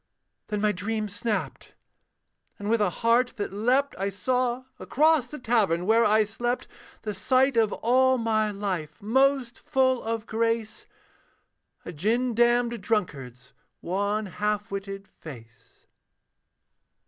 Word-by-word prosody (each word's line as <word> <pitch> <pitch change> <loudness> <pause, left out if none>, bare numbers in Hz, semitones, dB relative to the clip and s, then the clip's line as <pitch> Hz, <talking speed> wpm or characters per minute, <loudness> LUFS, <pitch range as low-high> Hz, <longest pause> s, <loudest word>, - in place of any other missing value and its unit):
Then 210 -1 -2
my 210 0 +3
dream 215 +3 -3
snapped: 210 +2 -4 0.8
and 205 +1 -3
with 230 -1 +2
a 205 - +3 0.2
heart 245 +2 +3
that 205 -2 -4
leapt 255 +7 +1
I 195 +1 0
saw 250 +5 -1 0.2
across 305 -2 +2
the 300 - -8
tavern 210 - +1
where 225 +3 +4
I 215 0 +4
slept, 240 +4 -3 0.4
The 210 - -3
sight 255 +7 +2
of 220 -2 +3
all 260 +2 +3
my 220 -2 +1
life 190 -7 -4
most 265 +2 +2
full 260 -4 +1
of 225 -1 -3
grace, 230 0 -2 1.0
A - - -6
gin 230 +10 0
damned 240 0 +2
drunkard's 135 - -3 0.3
wan 205 +4 -1
half 210 +2 -2
witted 195 0 -6
face. 120 -11 -14
220 Hz, 125 wpm, -26 LUFS, 200-245 Hz, 1.0 s, where